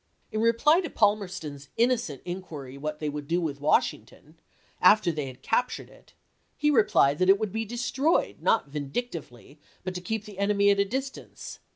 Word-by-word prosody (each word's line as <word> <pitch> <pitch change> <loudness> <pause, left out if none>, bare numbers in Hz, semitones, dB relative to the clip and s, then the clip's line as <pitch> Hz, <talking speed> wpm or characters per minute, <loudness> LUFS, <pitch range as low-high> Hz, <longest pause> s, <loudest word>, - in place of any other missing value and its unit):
In 215 - -1
reply 235 +9 +4
to 335 - -5
Palmerston's 185 -10 -1
innocent 235 - 0
inquiry 165 -8 -7
what 150 +2 -4
they 150 - -4
would 145 -1 -5
do 170 +2 +1
with 145 -5 -3
Washington, 155 +1 -1 0.4
after 185 -1 +5
they 150 -3 -4
had 130 -1 -11
captured 250 +2 -1
it, - - -21 0.4
he 300 0 +2
replied 180 - +3
that 185 0 +3
it 195 - +7
would 215 -2 -3
be 225 +2 -2
destroyed, 245 +7 0
not 225 - +2
vindic 150 - -3
tively, 140 -2 -10 0.2
but 185 - -4
to 180 - -5
keep 215 +3 -3
the 205 -2 -11
enemy 200 0 +3
at 200 - +1
a 200 - +3
distance. 265 +6 -6
190 Hz, 180 wpm, -27 LUFS, 150-225 Hz, 0.4 s, it